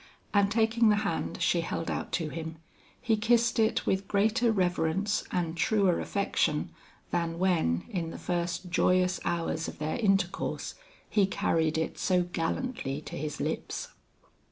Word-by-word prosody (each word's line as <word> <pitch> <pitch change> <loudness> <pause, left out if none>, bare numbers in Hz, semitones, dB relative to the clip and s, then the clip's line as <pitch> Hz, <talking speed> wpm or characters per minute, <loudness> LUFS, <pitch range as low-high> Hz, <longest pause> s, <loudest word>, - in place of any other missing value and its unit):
And 200 -1 +4
taking 225 +1 +3
the 210 - +5
hand 165 -4 -2
she 170 - +3
held 165 0 -3
out - - -3
to 165 -2 0
him, 160 0 -5 0.4
he 235 -3 +2
kissed 230 +1 +2
it 220 0 +2
with 190 +1 0
greater 220 +4 +2
reverence 185 +1 +1
and 170 -2 -1
truer 195 0 +2
affection 170 -6 0 0.4
than 165 -1 -1
when, 170 - +2
in 170 -4 -3
the - - -7
first 175 0 -2
joyous 180 0 +3
hours 165 -1 -1
of - - -7
their 155 +1 -2
intercourse, 195 -5 0 0.3
he 200 -3 +3
carried 160 -4 +1
it 160 - -2
so 180 -2 +2
gallantly 170 - -2
to - - -8
his 150 0 -4
lips. - - -3
180 Hz, 150 wpm, -29 LUFS, 165-210 Hz, 0.4 s, the